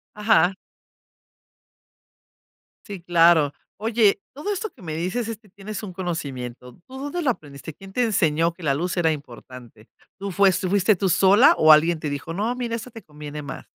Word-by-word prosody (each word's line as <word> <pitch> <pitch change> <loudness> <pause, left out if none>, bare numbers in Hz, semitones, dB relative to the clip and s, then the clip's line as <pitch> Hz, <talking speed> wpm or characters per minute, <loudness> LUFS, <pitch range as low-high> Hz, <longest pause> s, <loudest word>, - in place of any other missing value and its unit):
Ajá. 210 -4 +3 2.3
Sí, 200 -4 -7
claro. 165 -4 +4 0.2
Oye, 215 -1 +2
todo 300 +10 -4
esto 435 +3 -3
que - - -20
me 160 -3 -5
dices 185 +9 -2
es 225 -2 -5
que 215 -1 -24
tienes 205 +2 -8
un 190 -4 -8
conocimiento, 130 -9 -6
¿tú 260 +1 -10
dónde 290 +6 -4
lo 280 - +2
aprendiste?, 145 - -7
¿quién 195 +5 -14
te 250 - +1
enseñó 165 -6 +1
que 175 - -17
la 140 -3 +1
luz 175 +6 -3
era 165 -2 +3
importante? 125 -5 -9 0.3
¿Tú 200 0 -5
fue 195 +1 +4
tú 185 +1 -2
fuiste 200 +2 +3
tú 190 +1 -1
sola 195 - +5
o 155 0 +7
alguien 160 +2 +4
te 155 -1 -4
dijo: 145 +4 -5
"No, 215 +6 -1
mira, 240 -2 -3
esto 235 +2 -8
te 225 -1 -11
conviene 150 0 -9
más?". 140 -2 -8
180 Hz, 185 wpm, -23 LUFS, 155-215 Hz, 2.3 s, o